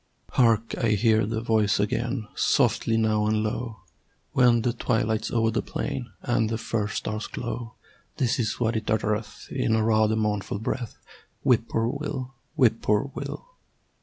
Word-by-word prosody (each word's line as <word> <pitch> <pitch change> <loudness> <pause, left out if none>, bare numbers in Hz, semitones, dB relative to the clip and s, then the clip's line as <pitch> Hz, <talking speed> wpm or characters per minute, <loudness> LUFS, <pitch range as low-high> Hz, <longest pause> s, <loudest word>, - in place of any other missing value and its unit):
Hark! 115 -2 +3
I 110 -2 +3
hear 110 0 +3
the 110 0 -2
voice 110 -3 +2
again, 115 +2 -1
Softly 115 -1 +2
now 110 -1 +2
and 110 0 +1
low, 110 +1 -3 0.5
When 120 -2 +4
the 120 - +1
twilight's 110 -2 0
o'er 115 -1 +2
the 110 - 0
plain 115 - -4
And 115 -2 +1
the 115 - -1
first 110 -2 -2
stars 105 +1 -3
glow. 120 -1 -5 0.4
This 120 -2 +1
is 110 -3 -1
what 115 -1 +1
it 110 0 -2
uttereth 105 0 -1
In 110 - +1
a 110 - +2
rather 110 0 +3
mournful 105 -2 -1
breath 115 +2 -4 0.5
"Whip 120 -4 +3
poor 115 - +1
will! 135 0 -3 0.2
Whip 120 -6 +3
poor 105 +7 +1
will!" - - -6
110 Hz, 160 wpm, -26 LUFS, 110-120 Hz, 0.5 s, When